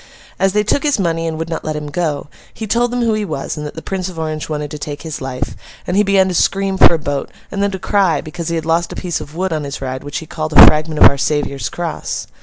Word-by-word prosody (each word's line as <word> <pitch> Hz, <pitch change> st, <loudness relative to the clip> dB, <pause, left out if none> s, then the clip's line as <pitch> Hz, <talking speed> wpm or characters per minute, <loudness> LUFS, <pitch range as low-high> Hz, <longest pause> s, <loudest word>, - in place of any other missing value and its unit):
As 195 Hz, 0 st, +2 dB
they 210 Hz, 0 st, +3 dB
took 220 Hz, +7 st, +1 dB
his 295 Hz, -2 st, +2 dB
money 165 Hz, -4 st, 0 dB
and 160 Hz, -1 st, -3 dB
would 165 Hz, +1 st, -3 dB
not 165 Hz, -, -4 dB
let 155 Hz, -, -3 dB
him 150 Hz, -1 st, -5 dB
go, 150 Hz, -3 st, -1 dB, 0.3 s
he 220 Hz, -, -6 dB
told 235 Hz, +3 st, +1 dB
them 245 Hz, 0 st, -1 dB
who 230 Hz, -1 st, +2 dB
he 215 Hz, 0 st, 0 dB
was, 155 Hz, -8 st, -3 dB
and 150 Hz, -, -5 dB
that -, -, -9 dB
the 160 Hz, -, -7 dB
Prince 190 Hz, -1 st, -3 dB
of 180 Hz, -, -11 dB
Orange 155 Hz, -1 st, -3 dB
wanted 150 Hz, -1 st, -3 dB
to 150 Hz, -, -6 dB
take 145 Hz, 0 st, -6 dB
his 160 Hz, -2 st, -5 dB
life; 130 Hz, 0 st, -4 dB, 0.3 s
and 180 Hz, -, -2 dB
he 205 Hz, -, +5 dB
began 195 Hz, -2 st, +3 dB
to 185 Hz, -, -2 dB
scream 195 Hz, +2 st, +1 dB
for -, -, +8 dB
a -, -, 0 dB
boat—and 145 Hz, +6 st, -5 dB
then 200 Hz, -, +2 dB
to 190 Hz, -, -4 dB
cry, 185 Hz, -5 st, +2 dB
because 160 Hz, +2 st, -6 dB
he 170 Hz, -, -1 dB
had 160 Hz, -1 st, -2 dB
lost 165 Hz, +1 st, +1 dB
a -, -, -6 dB
piece 175 Hz, -3 st, -3 dB
of 150 Hz, -, -10 dB
wood 185 Hz, 0 st, -1 dB
on 155 Hz, -1 st, -2 dB
his 140 Hz, 0 st, -5 dB
ride 130 Hz, -1 st, -4 dB
which 145 Hz, -, -5 dB
he 160 Hz, -, -5 dB
called 155 Hz, 0 st, -4 dB
a -, -, +11 dB
fragment 155 Hz, 0 st, +4 dB
of -, -, +12 dB
Our 140 Hz, -, 0 dB
Saviour's 145 Hz, -1 st, -1 dB
cross. 170 Hz, -2 st, -4 dB
165 Hz, 285 wpm, -17 LUFS, 150-190 Hz, 0.3 s, of